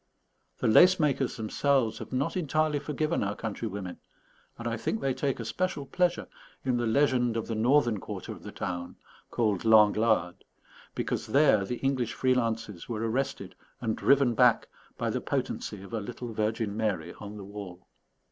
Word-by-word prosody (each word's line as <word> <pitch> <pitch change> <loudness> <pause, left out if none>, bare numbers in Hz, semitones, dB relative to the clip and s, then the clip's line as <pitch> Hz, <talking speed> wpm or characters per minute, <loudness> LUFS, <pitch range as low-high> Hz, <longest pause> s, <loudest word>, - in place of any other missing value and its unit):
The - - 0
lace 180 +12 +7
makers 140 -4 +1
themselves 120 +2 +1
have - - -8
not 130 +2 -1
entirely 155 -3 +1
forgiven 150 +1 -1
our 100 +1 -2
countrywomen; 100 -4 -5 0.6
and 120 - -5
I 115 - -1
think 110 0 -2
they 135 -1 0
take 135 0 -1
a 115 - -4
special 180 - -2
pleasure 175 +4 0 0.4
in 125 -2 +1
the 120 -1 0
legend 125 -2 +2
of 115 - -2
the 115 - -4
northern 120 -1 +3
quarter - - -7
of - - -9
the - - -8
town, 90 0 -5 0.3
called 105 -6 0
L'Anglade, 110 -4 +4 0.5
because - - -2
there 135 -9 +4
the 120 +5 -3
English 130 -4 0
free 130 -1 +2
lances 115 -6 -2
were 115 -1 -2
arrested 110 -6 -2 0.3
and 110 -3 -1
driven 140 -3 +3
back 125 -1 +4 0.3
by - - -1
the - - -2
potency 100 -2 -3
of 100 - -11
a 115 - -1
little 120 +2 -6
Virgin 110 -1 -1
Mary 95 -7 -2
on 105 0 -8
the 100 - -8
wall. 100 -3 -9
115 Hz, 170 wpm, -28 LUFS, 105-135 Hz, 0.6 s, lace